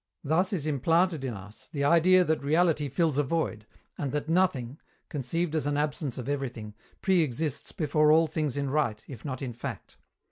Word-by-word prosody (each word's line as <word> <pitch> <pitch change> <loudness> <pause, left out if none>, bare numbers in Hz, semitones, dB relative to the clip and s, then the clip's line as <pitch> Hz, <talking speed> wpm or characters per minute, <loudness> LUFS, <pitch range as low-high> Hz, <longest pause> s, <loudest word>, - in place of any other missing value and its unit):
Thus 165 +6 +2
is 170 -8 -2
implanted 160 +2 +2
in 125 -4 -3
us 100 +2 -12
the 145 -4 -2
idea 170 +5 +5
that 160 -4 0
reality 155 -1 +2
fills 150 +1 +1
a - - +3
void, 130 -8 -2 0.3
and 140 -3 -2
that 150 0 -2
Nothing, 155 -7 +1 0.3
conceived 155 +3 -2
as 155 -2 0
an 145 0 0
absence 145 -2 -2
of 125 -1 -5
everything, 125 -7 -4 0.3
pre 190 -3 +4
exists 145 0 -2
before 150 -1 +2
all 160 +1 +6
things 155 -3 -2
in 140 -1 -1
right, 120 -8 0
if 130 - -9
not 135 -2 -4
in 125 -3 -4
fact. 120 - -7
150 Hz, 185 wpm, -28 LUFS, 135-165 Hz, 0.3 s, all